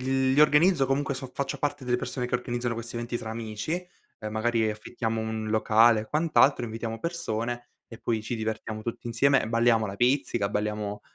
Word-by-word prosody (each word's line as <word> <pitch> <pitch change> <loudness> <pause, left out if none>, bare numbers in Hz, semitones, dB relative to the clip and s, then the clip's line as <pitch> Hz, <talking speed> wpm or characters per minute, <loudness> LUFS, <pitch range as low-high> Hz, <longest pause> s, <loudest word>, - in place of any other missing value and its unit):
L 130 0 +1
li 145 - +4
organizzo 150 0 +5
comunque, 140 +1 0
so 130 -1 -6
faccio 140 - -3
parte 145 -2 -2
delle 125 0 +1
persone 125 0 -3
che - - +2
organizzano 120 -1 -3
questi 115 +1 -7
eventi 120 0 -3
tra 110 - -6
amici, 110 +4 -4 0.5
ehm, 105 0 -5
magari 110 0 +1
affittiamo 110 +1 -3
un 110 -1 -3
locale 110 +1 +5
e - - -11
quant'altro, 150 -4 +3
invitiamo 115 0 -5
persone 120 -8 -3 0.2
e 115 - -10
poi 110 -2 -1
ci 115 +2 -3
divertiamo 110 0 -4
tutti 115 +1 -5
insieme 135 +4 +3
e 110 - -4
balliamo 115 -1 +3
la 100 0 -6
pizzica, 120 -4 +1
balliamo 105 -1 -2
115 Hz, 190 wpm, -27 LUFS, 110-130 Hz, 0.5 s, organizzo